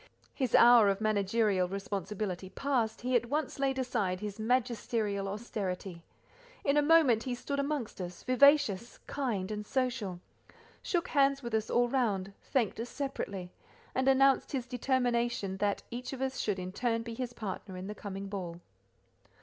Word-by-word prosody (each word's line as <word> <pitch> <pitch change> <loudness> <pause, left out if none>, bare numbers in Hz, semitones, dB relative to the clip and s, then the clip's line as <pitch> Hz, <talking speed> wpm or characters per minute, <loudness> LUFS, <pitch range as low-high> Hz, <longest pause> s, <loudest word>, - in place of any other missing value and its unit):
His 260 -5 0
hour 235 -3 +8
of 195 0 0
managerial 205 -2 +2
responsibility 195 -1 -4
past, 240 -3 -1
he 255 +1 0
at 240 0 +2
once 295 +2 -2
laid 270 -1 +1
aside 220 -8 -1
his 210 0 -6
magisterial 225 -4 0
austerity; 195 -4 -4 0.6
in 280 - +2
a 295 - +5
moment 295 -7 +5
he 250 0 -3
stood 280 +3 -3
amongst 280 -8 -2
us, 180 0 -7
vivacious, 255 -5 +4
kind, 220 -9 -2
and 210 0 -3
social, 235 -7 -2 0.6
shook 345 -2 -1
hands 275 -1 +3
with 235 -1 -5
us 220 -1 0
all 240 0 +3
round, 205 -7 0
thanked 235 -5 0
us 235 +1 -4
separately, 200 -10 -4 0.4
and 260 +1 0
announced 270 +1 +4
his 255 -3 -1
determination 240 -5 0
that 205 0 0
each 250 +3 -5
of 265 - -6
us 265 0 -2
should 205 -3 0
in 185 0 -5
turn 230 +2 -1
be 230 0 -6
his 240 +1 -4
partner 195 -3 -6
in 185 - -6
the 210 - -5
coming 200 -2 -6
ball. 180 -4 -5
230 Hz, 160 wpm, -31 LUFS, 200-260 Hz, 0.6 s, hour